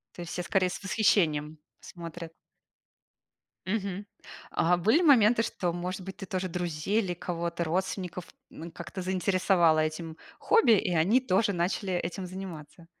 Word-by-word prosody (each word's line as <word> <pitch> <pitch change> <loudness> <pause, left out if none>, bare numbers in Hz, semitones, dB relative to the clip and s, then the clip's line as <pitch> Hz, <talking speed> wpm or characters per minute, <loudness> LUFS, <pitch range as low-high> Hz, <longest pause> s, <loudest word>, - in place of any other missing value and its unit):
То - - -9
есть 170 - -7
все 180 - -3
скорее 185 -1 +1
с - - -7
восхищением 160 -7 +1 0.2
смотрят? 170 -1 -9 1.3
Мгм. 200 0 -3 0.4
А 175 +2 +2
были 220 - +3
моменты, 235 -7 +5
что, 180 -6 -2
может 180 +2 -4
быть, 190 +1 -8
ты 195 - -7
тоже 185 0 -2
друзей 175 +4 -1
или 180 -3 -3
кого-то, 170 0 -3
родственников, 180 +1 -3 0.3
м, 165 +2 -9
как-то 175 +3 -7
заинтересовала 185 -3 +2
этим 160 +1 -3 0.2
хобби, 455 - +4
и 180 - -1
они 185 +10 +4
тоже 205 -3 +1
начали 185 +2 -1
этим 175 +2 -3
заниматься? 175 -3 -9
180 Hz, 145 wpm, -28 LUFS, 170-195 Hz, 1.3 s, моменты